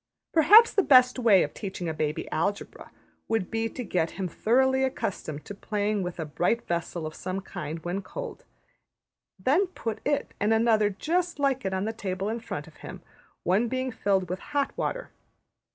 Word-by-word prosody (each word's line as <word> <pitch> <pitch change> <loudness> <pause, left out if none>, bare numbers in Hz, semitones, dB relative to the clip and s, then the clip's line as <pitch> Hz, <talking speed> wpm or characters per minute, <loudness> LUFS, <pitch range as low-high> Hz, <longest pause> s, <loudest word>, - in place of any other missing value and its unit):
Perhaps 410 +9 +7
the 400 - +4
best 255 -6 +5
way 215 -6 +5
of 150 - -5
teaching 190 -3 -5
a 160 - -1
baby 155 -1 -2
Algebra 200 +6 -3 0.4
would 220 -5 -1
be 225 0 -1
to 250 - -6
get 170 -6 0
him 190 -2 -2
thoroughly 265 +9 +2
accustomed 165 - -3
to - - -7
playing 205 0 -1
with 180 -1 -5
a 160 - -2
bright 175 +10 0
vessel 170 -1 -3
of 155 - -5
some 185 +3 -4
kind 160 -3 -7
when 180 +3 -2
cold; - - -7 0.9
then 285 - +2
put 230 -11 -5
it 290 -1 -1
and 215 +2 +3
another 220 -2 +3
just 340 - -1
like 275 -4 0
it 190 - -1
on 190 +2 -1
the 220 - -2
table 195 -2 -3
in 230 +2 -2
front 225 - -6
of - - -17
him, - - -10 0.4
one 200 +7 +2
being 255 +1 -2
filled 195 -4 0
with 185 +2 -4
hot 285 -1 -2
water. - - -3
215 Hz, 185 wpm, -27 LUFS, 185-260 Hz, 0.9 s, Perhaps